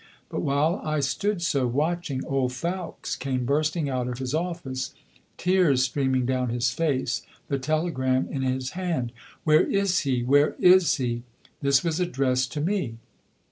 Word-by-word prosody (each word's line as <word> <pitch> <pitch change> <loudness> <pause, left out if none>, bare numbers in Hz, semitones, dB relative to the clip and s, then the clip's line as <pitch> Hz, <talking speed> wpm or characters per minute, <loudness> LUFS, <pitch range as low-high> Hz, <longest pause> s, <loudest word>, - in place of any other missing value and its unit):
But - - -3
while 145 - +1
I 155 -1 0
stood 170 +8 -1
so, 140 -6 +1
watching, 150 +1 -1
old 135 -2 0
Fowkes 175 +5 -4
came 130 -1 -2
bursting 150 +3 +1
out 130 -2 -1
of 125 -1 -4
his 130 0 -4
office, 160 -6 -3 0.4
tears 180 -8 +3
streaming 130 -1 +1
down 130 -1 0
his 120 +1 +1
face, 130 -6 0 0.3
the 140 - 0
telegram 130 -3 0
in 135 - -2
his 130 0 -1
hand. 170 -10 -2 0.3
"Where 155 -1 +5
is 195 -2 +1
he? 130 -4 0
Where 145 +4 +3
is 180 -1 +6
he?" 120 -4 -2 0.4
This 140 -1 +3
was 165 0 0
addressed 130 -7 0
to 145 - -2
me. 155 - -1
140 Hz, 155 wpm, -26 LUFS, 130-165 Hz, 0.4 s, is